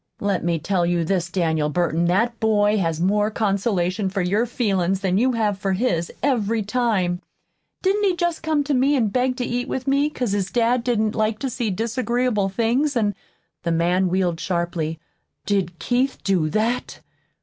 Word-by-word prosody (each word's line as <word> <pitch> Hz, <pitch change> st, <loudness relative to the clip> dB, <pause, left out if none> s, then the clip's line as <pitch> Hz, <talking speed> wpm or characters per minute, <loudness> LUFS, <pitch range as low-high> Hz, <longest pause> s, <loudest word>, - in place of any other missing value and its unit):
Let 200 Hz, -2 st, -1 dB
me 170 Hz, -1 st, +1 dB
tell 175 Hz, +3 st, 0 dB
you 170 Hz, 0 st, +1 dB
this, 175 Hz, 0 st, 0 dB
Daniel 160 Hz, -4 st, 0 dB
Burton 170 Hz, +1 st, 0 dB
that 230 Hz, +7 st, +1 dB
boy 210 Hz, -1 st, +2 dB
has 165 Hz, -3 st, -1 dB
more 205 Hz, +4 st, +2 dB
consolation 200 Hz, -2 st, 0 dB
for 195 Hz, 0 st, -2 dB
your 205 Hz, +7 st, +1 dB
feelin's 195 Hz, -5 st, 0 dB
than 190 Hz, 0 st, +1 dB
you 255 Hz, +2 st, +2 dB
have 210 Hz, -4 st, 0 dB
for 195 Hz, 0 st, 0 dB
his, 185 Hz, -5 st, 0 dB
every 230 Hz, -5 st, +1 dB
time. 205 Hz, -6 st, 0 dB, 0.6 s
Didn't 400 Hz, +2 st, +2 dB
he 375 Hz, -3 st, +2 dB
jest 345 Hz, -1 st, -1 dB
come 315 Hz, -2 st, +1 dB
to 285 Hz, +1 st, -1 dB
me 270 Hz, +3 st, +3 dB
an' 230 Hz, -6 st, +2 dB
beg 255 Hz, +3 st, 0 dB
to 250 Hz, -, -1 dB
eat 245 Hz, +2 st, -2 dB
with 260 Hz, -1 st, -3 dB
me, 280 Hz, +2 st, +2 dB
'cause 250 Hz, -7 st, -3 dB
his 195 Hz, -2 st, -1 dB
dad 240 Hz, +2 st, +1 dB
didn't 220 Hz, -3 st, +1 dB
like 215 Hz, 0 st, 0 dB
to 260 Hz, +3 st, -3 dB
see 240 Hz, -2 st, -2 dB
disagreeable 230 Hz, 0 st, 0 dB
things, 240 Hz, +7 st, +1 dB
an' 210 Hz, -3 st, +1 dB, 0.3 s
" -, -, -49 dB
The 170 Hz, -, 0 dB
man 175 Hz, +3 st, +2 dB
wheeled 180 Hz, -2 st, 0 dB
sharply. 170 Hz, -3 st, -2 dB, 0.5 s
"Did 190 Hz, -4 st, -1 dB
Keith 255 Hz, +6 st, 0 dB
do 180 Hz, -6 st, +1 dB
that?" 225 Hz, +8 st, -1 dB
210 Hz, 180 wpm, -22 LUFS, 180-245 Hz, 0.6 s, me